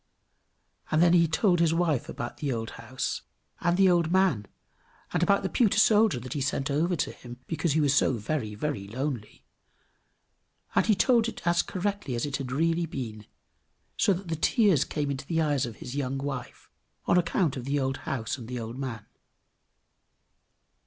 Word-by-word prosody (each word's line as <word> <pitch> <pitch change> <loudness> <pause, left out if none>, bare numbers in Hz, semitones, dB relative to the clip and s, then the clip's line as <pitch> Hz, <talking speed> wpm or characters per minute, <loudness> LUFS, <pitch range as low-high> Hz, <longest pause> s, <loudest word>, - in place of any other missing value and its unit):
And 155 - +2
then 170 +1 +5
he 170 -1 +5
told 175 +2 +2
his 165 -1 +3
wife 165 -7 0
about 120 - -5
the 145 -3 -2
old 115 -2 -3
house, 115 +3 -4 0.4
and 175 +1 +1
the 195 0 +6
old 170 -2 +2
man, 185 - +2 0.7
and 175 - +1
about 200 +3 +3
the - - +1
pewter 220 -6 +2
soldier 215 - +4
that 130 0 -6
he 145 - -2
sent 135 0 -1
over 165 +5 +1
to 150 - -1
him 120 0 -11
because 160 -1 -1
he 160 - +2
was 145 -3 +3
so 140 - +3
very, 110 -1 -3
very 110 -5 -3
lonely; 125 0 -5 1.3
and - - +2
he 215 - +5
told 235 +3 +3
it 230 - -7
as 170 0 +3
correctly 195 -8 -3
as 120 - -1
it 140 -2 -2
had 130 -2 -5
really 165 +4 +1
been, 110 -8 -6 0.7
so - - +3
that 190 0 -2
the 165 - -1
tears 180 - +3
came 145 -2 -2
into 135 0 -5
the 165 -1 0
eyes 145 -5 +1
of 115 - -8
his 125 +5 -8
young 135 -1 -2
wife, 135 -2 -6 0.4
on - - +3
account 170 -3 0
of 125 -2 -6
the 140 +1 0
old 135 0 -1
house 130 0 -3
and 115 - -9
the 125 0 -4
old 115 +3 -6
man. 130 -5 -5
145 Hz, 185 wpm, -28 LUFS, 130-175 Hz, 1.3 s, the